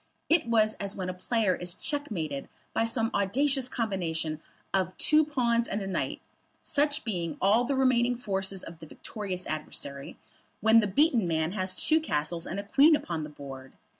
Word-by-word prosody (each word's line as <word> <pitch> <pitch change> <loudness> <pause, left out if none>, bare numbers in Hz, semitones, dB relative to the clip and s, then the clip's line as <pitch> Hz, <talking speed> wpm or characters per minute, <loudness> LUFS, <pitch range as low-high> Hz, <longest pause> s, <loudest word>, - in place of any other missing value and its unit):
It 320 -6 +4
was 220 -2 +3
as 200 -1 -3
when 185 -1 -3
a - - -2
player 200 +1 +1
is 175 0 -4
checkmated 185 - -3 0.2
by 225 - +2
some 230 0 -1
audacious 255 +7 +1
combination 165 -9 -2 0.3
of 185 -1 0
two 310 0 +5
pawns 240 -6 +1
and 205 - -2
a 195 - -4
knight, 195 - -2 0.4
such 290 0 0
being 175 -8 -3
all 215 +5 +4
the 275 +2 0
remaining 250 -2 +3
forces 195 -5 -2
of 165 -1 -10
the 160 - -10
victorious 190 0 -5
adversary, 140 -2 -5 0.4
when 220 +2 +6
the 210 - +2
beaten 235 - +3
man 160 0 0
has 185 -2 -1
two 315 +1 +3
castles 165 - -2
and 190 - -3
a - - -4
queen 285 +10 +6
upon 165 - -3
the 150 - -6
board. 135 -2 -10
200 Hz, 175 wpm, -28 LUFS, 175-240 Hz, 0.4 s, when